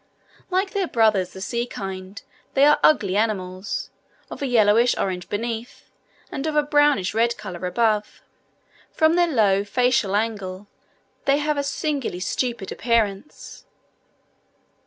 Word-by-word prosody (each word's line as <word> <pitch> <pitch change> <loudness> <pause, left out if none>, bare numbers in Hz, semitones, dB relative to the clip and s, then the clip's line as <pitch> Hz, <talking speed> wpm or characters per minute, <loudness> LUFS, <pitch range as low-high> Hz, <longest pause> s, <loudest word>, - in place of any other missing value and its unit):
Like 380 +1 0
their 395 -3 -1
brothers 215 - +2
the 190 - -9
sea 235 +4 -2
kind, 190 -2 -7 0.4
they 275 +1 +6
are 295 0 +5
ugly 200 -11 +3
animals, 195 -3 -2 0.4
of - - -8
a 280 - -1
yellowish 230 0 +4
orange 180 -2 -3
beneath, 230 +2 -5 0.4
and 275 +3 -3
of 310 - -2
a 300 - +4
brownish 290 -9 +2
red 235 +2 +1
colour 180 -3 -6
above: 210 +2 0 0.7
from 315 0 +3
their 350 0 +3
low 200 -6 +3
facial 230 -2 +1
angle 205 -3 -3 0.6
they 275 +1 +3
have 300 0 0
a - - +2
singularly 280 - -2
stupid 230 +2 -3
appearance. 230 +1 -2
225 Hz, 135 wpm, -23 LUFS, 195-275 Hz, 0.7 s, they